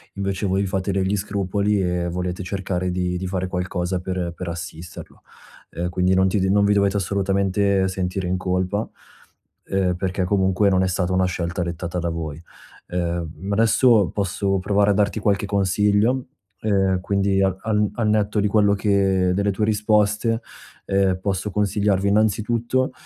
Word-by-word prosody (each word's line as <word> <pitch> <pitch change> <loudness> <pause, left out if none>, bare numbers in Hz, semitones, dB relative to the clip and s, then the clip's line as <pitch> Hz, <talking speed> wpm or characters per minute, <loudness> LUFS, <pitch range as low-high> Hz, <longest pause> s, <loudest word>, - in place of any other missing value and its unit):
invece 100 0 -2
voi 95 +1 +1
fate 95 +1 -2
degli 95 +1 0
scrupoli 100 0 -1
e 90 -1 -1
volete 90 +1 -3
cercare 90 -1 -2
di 90 0 -1
di 95 +1 -4
fare 95 0 -2
qualcosa 90 0 -2
per 90 -2 -3
per 90 -2 -5
assisterlo. 85 0 -8 0.5
Ehm, 85 +3 -3
quindi, 90 +1 +1
non 95 0 +3
ti 95 0 +1
non 100 +1 +3
vi 105 - +3
dovete 100 0 +2
assolutamente 100 0 +1
sentire 95 0 -3
in 90 - 0
colpa, 95 +3 -1 0.8
ehm, 95 -2 0
perché 95 0 -2
comunque 95 +1 +2
non 95 0 +2
è - - +1
stata 90 0 -1
una 95 0 +2
scelta 90 -1 -2
dettata 85 +1 -4
da 85 0 -2
voi. 80 -2 -5 0.5
Ehm, 85 -2 -2
mhmm, 95 +6 -6
adesso 110 -2 +4
posso 95 0 -1
provare 100 +2 +2
a - - +3
darti 100 +2 +1
qualche 100 -1 +1
consiglio: 105 +5 +1 0.4
ehm, 95 -3 +1
quindi 100 0 +1
al 95 -1 +1
al 105 -1 +1
al 110 -3 0
netto 105 0 +1
di 105 - +2
quello 100 -1 +3
che 95 -2 +2
delle 100 +1 +1
tue 105 +2 -1
risposte, 105 +1 +1 0.4
ehm, 95 -1 +1
posso 100 +1 -2
consigliarvi 100 -1 +1
innanzitutto, 110 +5 +1
95 Hz, 160 wpm, -22 LUFS, 90-100 Hz, 0.8 s, adesso